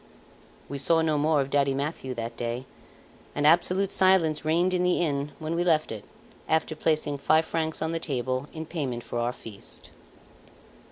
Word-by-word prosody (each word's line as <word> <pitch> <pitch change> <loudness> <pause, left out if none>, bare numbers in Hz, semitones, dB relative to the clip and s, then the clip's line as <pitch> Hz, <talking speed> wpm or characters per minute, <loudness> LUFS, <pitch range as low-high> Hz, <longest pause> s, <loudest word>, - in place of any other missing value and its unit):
We 140 - -4
saw 165 +4 +3
no 155 -2 +1
more 150 0 +3
of 135 0 -4
Daddy 140 -1 +2
Mathieu 140 -2 -3
that 115 0 -4
day, 120 +2 -3 0.7
and 145 - 0
absolute 180 +4 +4
silence 185 -5 +3
reigned 170 +4 +2
in 180 - +1
the 180 0 +2
inn 145 -3 -1
when 160 0 -4
we 170 +1 +1
left 160 -3 +2
it, 110 -2 -7 0.4
after 160 0 +1
placing 155 -2 0
five 155 +3 +3
francs 160 -1 -2
on 160 - -1
the 165 - -1
table 130 -2 -2
in 160 0 -6
payment 135 -8 -3
for 120 - -4
our 120 +1 0
feast. 110 -4 -10
155 Hz, 175 wpm, -27 LUFS, 135-165 Hz, 0.7 s, absolute